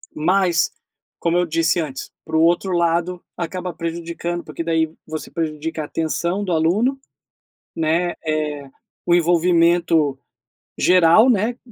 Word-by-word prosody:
Mas, 175 +1 +2 0.5
como 170 +1 +1
eu 180 - +2
disse 165 +1 +1
antes, 140 -5 -5
para 160 - -1
um - - +4
outro 175 +3 +2
lado, 175 +1 0
acaba 180 +1 -4
prejudicando, 170 +1 -4
porque 165 - -6
daí 160 -1 0
você 155 0 -6
prejudica 160 -1 -3
a - - -5
atenção 170 +5 -2
do 185 - -3
aluno, 195 +12 +1 0.8
né, 165 +2 0
eh, 150 -3 -2 0.4
o 175 - +4
envolvimento 170 -3 +3 0.6
geral, 180 +6 +5
né, 235 +1 +1
170 Hz, 130 wpm, -20 LUFS, 160-175 Hz, 0.8 s, geral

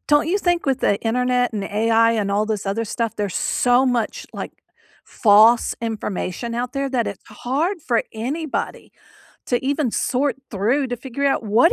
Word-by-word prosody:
don't 295 +1 +4
you 395 - +2
think 350 -4 0
with 270 -2 +1
the 200 - +2
internet 250 +2 +1
and 205 -2 -3
AI 225 +2 +3
and 210 -3 -1
all 210 +2 +1
this 210 -2 -3
other 210 +4 -1
stuff, 230 +1 -3
there's 205 -3 -2
so 245 +1 +2
much, 240 -4 -1
like, - - -6 0.5
false 220 +2 +5
information 225 0 -4
out 245 +1 -3
there 275 0 -1
that 245 -3 0
it's 200 - -6
hard 320 +10 -2
for 235 -2 +2
anybody 275 +8 -4 0.5
to 245 0 -1
even 280 -1 0
sort 270 +5 0
through 235 +8 +1
to 245 -1 -4
figure 265 +3 -3
out 275 - +1
what 225 - +4
240 Hz, 175 wpm, -21 LUFS, 220-270 Hz, 0.5 s, false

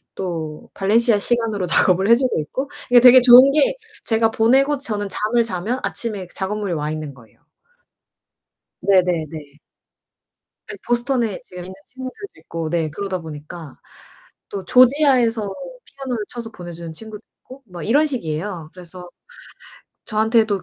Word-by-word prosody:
또 160 -5 -5
발렌시아 220 +2 +2
시간으로 220 -3 -1
작업을 185 +4 +3
해 235 - +8
주고 255 -8 0
있고. 265 - -5 0.2
이게 245 - +8
되게 250 +1 +8
좋은 255 +2 +8
게 - - +2 0.3
제가 225 0 +1
보내고 270 +6 +3
저는 205 -6 -3
잠을 225 +5 0
자면 220 +5 -3
아침에 205 -6 -4
그 - - -18
작업물이 200 -1 -3
와 150 -1 -3
있는 155 -3 -6
거예요. 115 -5 -20 1.4
네 190 -1 +4
네 170 -3 -1
네. 150 -2 -11 1.1
네 - - -7
보스턴에 240 -3 0
지금 180 -1 -10
있는 185 +1 -9
친구들도 260 +10 -9
있고 165 -1 -5
네 165 -1 -1
그러다 190 +4 -4
보니까. 155 -1 -10 0.8
또 195 -2 -6
조지아에서 250 - +4 0.4
피아노를 260 -6 -5
쳐서 235 -2 -7
보내주는 170 -3 -9
친구도 220 +3 -9 0.2
있고 260 +2 -13
뭐 180 -3 -9
이런 290 +8 +3
식이에요. 170 - -4
그래서 180 0 -12 1.0
저한테도 220 -2 +1
210 Hz, 315 characters per minute, -20 LUFS, 175-240 Hz, 1.4 s, 해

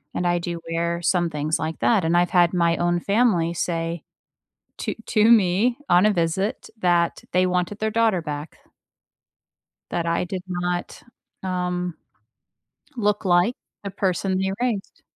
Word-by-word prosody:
And 180 - -1
I 175 0 +2
do 170 -1 -4
wear 170 +1 -1
some 175 -1 +2
things 150 +1 -1
like 160 0 -4
that. 215 -7 +3
And 165 +1 +2
I've 175 0 +3
had 175 -1 +4
my 170 -1 +2
own 175 0 +1
family 200 -5 +2
say 165 -1 -2 0.8
to - - -3
to 215 +1 +3
me 220 +3 +4
on 180 +4 +5
a 215 - +4
visit 190 +6 -1
that 175 -2 +1
they 185 +1 +3
wanted 180 +3 -1
their 220 0 -1
daughter 220 -5 +2
back. 150 0 -6 1.3
That 170 - -1
I 170 +1 0
did 180 0 -5
not, 175 -1 -3 0.4
um 180 -2 -2 1.0
look 210 -2 0
like 180 +6 +3 0.3
the 200 - -4
person 190 -1 -1
they 190 0 0
raised. 230 -6 -2
180 Hz, 150 wpm, -23 LUFS, 170-195 Hz, 1.3 s, on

